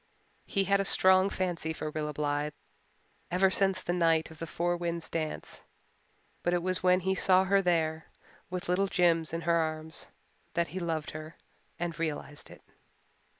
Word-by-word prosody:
He 195 Hz, -, +1 dB
had 195 Hz, -, -4 dB
had 200 Hz, -, +5 dB
a 195 Hz, -, 0 dB
strong 190 Hz, 0 st, +5 dB
fancy 175 Hz, -4 st, -2 dB
for 155 Hz, -1 st, -4 dB
Rilla 150 Hz, 0 st, -2 dB
Blythe 145 Hz, 0 st, -1 dB, 0.8 s
ever 190 Hz, +2 st, +3 dB
since 190 Hz, -1 st, +1 dB
the 175 Hz, -, -1 dB
night 165 Hz, -2 st, +2 dB
of 160 Hz, -, -13 dB
the 165 Hz, -, -4 dB
Four 175 Hz, +2 st, 0 dB
Winds 170 Hz, -1 st, -3 dB
dance; 155 Hz, -2 st, -4 dB, 0.8 s
but 175 Hz, 0 st, +1 dB
it 175 Hz, -, -1 dB
was 185 Hz, 0 st, -1 dB
when 185 Hz, 0 st, +4 dB
he 190 Hz, +1 st, +1 dB
saw 190 Hz, -1 st, +4 dB
her 195 Hz, +1 st, +3 dB
there, 160 Hz, -3 st, 0 dB, 0.4 s
with 180 Hz, 0 st, -4 dB
little 185 Hz, +3 st, +2 dB
Jims 170 Hz, -3 st, +2 dB
in 165 Hz, +1 st, -3 dB
her 170 Hz, +1 st, +1 dB
arms, 160 Hz, 0 st, -3 dB, 0.5 s
that 170 Hz, -1 st, +1 dB
he 185 Hz, +5 st, -4 dB
loved 165 Hz, -3 st, -2 dB
her 155 Hz, +1 st, -8 dB, 0.4 s
and 170 Hz, -2 st, -4 dB
realized 150 Hz, -2 st, -4 dB
it. -, -, -14 dB
170 Hz, 175 wpm, -30 LUFS, 160-185 Hz, 0.8 s, had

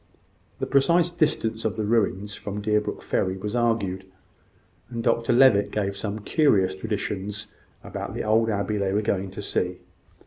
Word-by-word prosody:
The -, -, -2 dB
precise 170 Hz, +5 st, +3 dB
distance 145 Hz, -9 st, 0 dB
of 110 Hz, -, -1 dB
the 110 Hz, -1 st, -2 dB
ruins 105 Hz, -2 st, 0 dB
from 100 Hz, 0 st, -5 dB
Deerbrook 105 Hz, 0 st, -1 dB
ferry 95 Hz, 0 st, 0 dB
was 105 Hz, +4 st, -4 dB
argued, 110 Hz, -6 st, 0 dB, 0.9 s
and 115 Hz, -2 st, -4 dB
Dr 115 Hz, +1 st, +2 dB
Levitt 115 Hz, -5 st, +5 dB
gave 100 Hz, -1 st, -2 dB
some 100 Hz, +1 st, -3 dB
curious 105 Hz, -, +3 dB
traditions 105 Hz, 0 st, -4 dB, 0.3 s
about -, -, -6 dB
the -, -, -2 dB
old 110 Hz, +1 st, +3 dB
abbey 105 Hz, 0 st, -1 dB
they 95 Hz, -1 st, 0 dB
were 105 Hz, +1 st, +1 dB
going 100 Hz, -2 st, -1 dB
to 95 Hz, +2 st, -7 dB
see. 90 Hz, -2 st, -1 dB
105 Hz, 160 wpm, -25 LUFS, 100-115 Hz, 0.9 s, Levitt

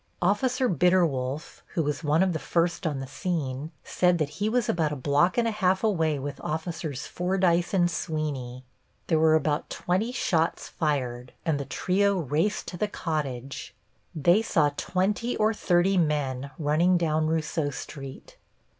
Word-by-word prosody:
Officer 250 Hz, +7 st, +2 dB
Bitterwolf, 160 Hz, -, +1 dB
who 165 Hz, -, +2 dB
was 150 Hz, +2 st, -2 dB
one 155 Hz, +4 st, +3 dB
of 185 Hz, -2 st, +1 dB
the 160 Hz, -, -2 dB
first 170 Hz, +1 st, 0 dB
on 145 Hz, -3 st, -2 dB
the 135 Hz, -, -4 dB
scene, 145 Hz, -2 st, -3 dB
said 180 Hz, -1 st, +2 dB
that 155 Hz, -3 st, -1 dB
he 210 Hz, -, +2 dB
was 245 Hz, 0 st, +1 dB
about 160 Hz, -3 st, +1 dB
a -, -, -2 dB
block 145 Hz, -, +2 dB
and 235 Hz, -1 st, +3 dB
a -, -, +1 dB
half 190 Hz, -2 st, +1 dB
away 165 Hz, -8 st, +2 dB
with 140 Hz, +1 st, -6 dB
Officers 160 Hz, -3 st, -4 dB
Fordyce 180 Hz, -1 st, +1 dB
and 180 Hz, -3 st, +3 dB
Sweeney. 145 Hz, -7 st, -3 dB, 0.4 s
There 160 Hz, -2 st, +2 dB
were 160 Hz, 0 st, +5 dB
about 150 Hz, -1 st, 0 dB
twenty 190 Hz, +7 st, -1 dB
shots 165 Hz, -9 st, 0 dB
fired, 125 Hz, -6 st, -2 dB
and 155 Hz, -4 st, +1 dB
the 140 Hz, -, -4 dB
trio 200 Hz, +5 st, +1 dB
raced 165 Hz, +6 st, 0 dB
to 175 Hz, -, -7 dB
the 210 Hz, -, 0 dB
cottage. 140 Hz, -9 st, -4 dB, 0.4 s
They 175 Hz, +7 st, +4 dB
saw 155 Hz, -9 st, +2 dB
twenty 205 Hz, +9 st, -1 dB
or 215 Hz, +1 st, +3 dB
thirty 185 Hz, -1 st, +2 dB
men 140 Hz, -4 st, 0 dB
running 165 Hz, +4 st, +3 dB
down 155 Hz, -2 st, +1 dB
Rousseau 160 Hz, -1 st, 0 dB
Street. 135 Hz, 0 st, -9 dB
160 Hz, 160 wpm, -27 LUFS, 145-185 Hz, 0.4 s, were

